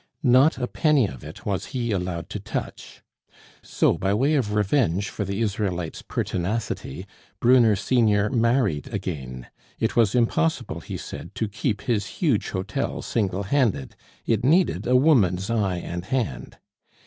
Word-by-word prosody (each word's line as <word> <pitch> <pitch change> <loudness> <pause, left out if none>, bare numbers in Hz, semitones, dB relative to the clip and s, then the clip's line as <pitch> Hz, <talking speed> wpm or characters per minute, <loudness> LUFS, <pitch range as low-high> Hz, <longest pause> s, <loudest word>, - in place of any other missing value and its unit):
Not 130 +4 +5
a 125 - -1
penny 150 -1 +2
of 65 -10 -7
it - - -10
was 100 -3 -2
he 120 -2 -1
allowed 90 -4 -2
to - - -4
touch. - - -6 0.6
So, - - +1
by 95 +2 +1
way 135 +7 +2
of 115 -8 0
revenge 100 - +1
for 105 - -4
the 100 +3 -3
Israelite's 95 -6 -2
pertinacity, 90 - -3 0.3
Brunner 120 -3 +5
senior 105 -1 +2
married 115 - +1
again. 70 - -5 0.3
It - - 0
was 115 -1 +3
impossible, 100 -10 +1
he - - -6
said, - - -8
to 110 - -1
keep 105 +1 -2
his 105 -5 -1
huge 140 - +1
hotel 95 0 -3
single 100 -3 -1
handed; 100 - 0 0.3
it 115 0 +1
needed 170 +8 +2
a 125 - +3
woman's 115 - +3
eye 100 -6 0
and 85 0 -5
hand. 125 +2 -3
105 Hz, 150 wpm, -24 LUFS, 95-125 Hz, 0.6 s, Not